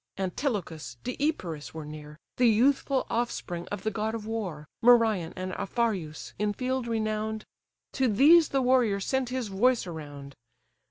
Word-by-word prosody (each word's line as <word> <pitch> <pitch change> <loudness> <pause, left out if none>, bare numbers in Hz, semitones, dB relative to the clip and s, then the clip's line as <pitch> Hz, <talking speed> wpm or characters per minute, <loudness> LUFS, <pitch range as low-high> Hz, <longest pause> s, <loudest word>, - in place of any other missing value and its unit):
Antilochus, 190 - -3
Deipyrus, 235 - -3
were 160 -2 -6
near, 150 0 -9 0.2
The 245 - +5
youthful 265 +4 +2
offspring 185 -7 -2
of 205 - -5
the 220 - 0
god 220 +1 -2
of 220 -2 -6
war, 190 -10 -4
Merion, 225 -8 +4
and 185 0 -4
Aphareus, 195 -9 -2
in 210 0 +1
field 255 +1 -2
renown'd: 215 -1 -2 0.5
To 265 -2 +1
these 300 +10 +6
the 270 -1 +1
warrior 245 -6 +3
sent 260 +5 -1
his 250 -4 -3
voice 235 +5 +2
around. 145 -5 -8
215 Hz, 145 wpm, -28 LUFS, 180-250 Hz, 0.5 s, these